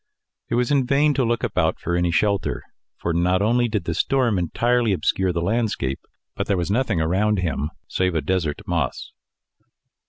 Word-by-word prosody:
It 115 - 0
was 125 +1 +1
in 135 -3 +2
vain 145 +2 +3
to 135 -1 +1
look 115 -1 0
about - - 0
for 85 - -2
any 85 0 +1
shelter; 90 -9 0 0.3
for 85 - -2
not 90 +3 +2
only 120 +3 +2
did 105 -4 -2
the 85 - -2
storm 120 - +1
entirely 115 +6 +1
obscure 95 0 0
the 85 -1 -2
landscape, 100 - -1 0.4
but - - -3
there 100 - +1
was 90 +2 -1
nothing 115 -5 +1
around 95 +6 +1
him 80 -5 -1 0.2
save 90 -2 0
a 80 - +1
desert 80 -1 -1
moss. - - -2
100 Hz, 180 wpm, -22 LUFS, 85-120 Hz, 0.4 s, vain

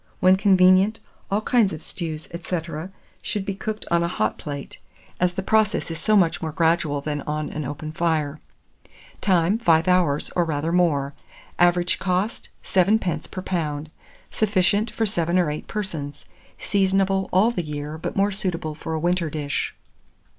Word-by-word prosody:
When 185 +1 +6
convenient, 190 +2 +4 0.3
all 205 +2 +1
kinds 220 -3 +3
of 155 - -5
stews, 160 -4 -4
&c., 175 +1 -2 0.6
should 205 -2 -2
be 195 - -2
cooked 215 +2 -5
on 170 0 +3
a 170 - +1
hot 110 -11 -1
plate, 140 -2 -7 0.4
as 180 0 +2
the 190 - -3
process 215 -4 +1
is 165 - -5
so 215 +5 +2
much 175 -4 +2
more 160 - -3
gradual 160 -2 +1
than 145 0 -3
on 150 0 -2
an 155 -1 -4
open 150 +3 -5
fire. 155 -3 0 0.8
Time. 185 +2 +2
5 165 -6 +3
hours, 175 -6 +2
or 175 - +3
rather 160 0 -1
more. 150 -6 +2 0.5
Average 175 0 +3
cost, 190 +4 -1
7d. 190 -1 +1
per 185 - -6
lb. 155 -5 -2 0.4
Sufficient 205 +1 +2
for 225 +1 -1
7 175 -4 0
or 175 -5 +2
8 150 - -6
persons. 160 -9 -5 0.3
Seasonable 195 -1 +1
all 200 +6 +4
the 220 - -2
year, 150 0 -5
but - - -4
more 200 +1 +3
suitable 180 -5 -2
for 160 +1 -5
a - - -1
winter 175 0 +1
dish. 145 -2 -3
175 Hz, 160 wpm, -23 LUFS, 155-195 Hz, 0.8 s, When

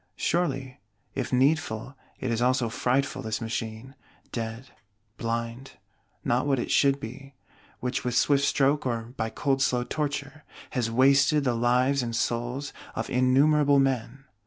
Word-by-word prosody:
Surely, 135 -7 -1 0.3
if - - -3
needful, 135 -2 +1 0.2
it 125 - -2
is 115 0 0
also 125 -1 +2
frightful, 130 +4 0
this 110 0 -3
Machine; 115 +2 -5 0.4
dead, 115 +2 -5 0.5
blind; 115 +3 -4 0.5
not 125 +4 +1
what 135 -2 +2
it 120 - -3
should 140 0 +4
be; 135 +3 -9 0.5
which, 125 - -2
with 125 -1 -1
swift 140 +1 +3
stroke, 140 +1 +2
or 115 -1 -3
by 110 -2 -2
cold 135 +2 0
slow 125 -2 +2
torture, 145 +3 -4 0.3
has 125 -5 -1
wasted 140 +5 +4
the 125 -3 +1
lives 125 +3 +2
and 115 -1 -3
souls 120 +5 -2 0.2
of - - -3
innumerable 140 +3 +4
men. 135 0 0
130 Hz, 140 wpm, -27 LUFS, 120-140 Hz, 0.5 s, should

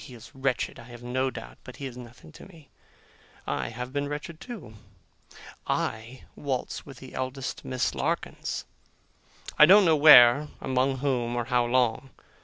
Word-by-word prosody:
He 125 - -11
is 115 0 -14
wretched, 135 -2 -2
I 115 - -12
have 120 -1 -12
no 130 +2 -1
doubt; - - -10
but 130 - -11
he 140 - -7
is 130 -3 -7
nothing 125 +4 -13
to - - -13
me. 165 -7 -18 0.8
I - - -2
have 125 +3 -7
been 145 0 -1
wretched, 150 +2 -7
too. 235 - -9 0.9
I 115 +4 -3
waltz 135 -1 -4
with 135 -2 -11
the 130 +1 -12
eldest 130 +1 -5
Miss 130 -1 -1
Larkins! - - -3 0.9
I 150 - +9
don't 200 +1 +7
know 160 -2 +4
where, 145 -2 +8
among 130 +1 0
whom, 120 -3 0
or 120 -1 -2
how 125 -1 +1
long. 125 +1 0
130 Hz, 165 wpm, -27 LUFS, 120-145 Hz, 0.9 s, I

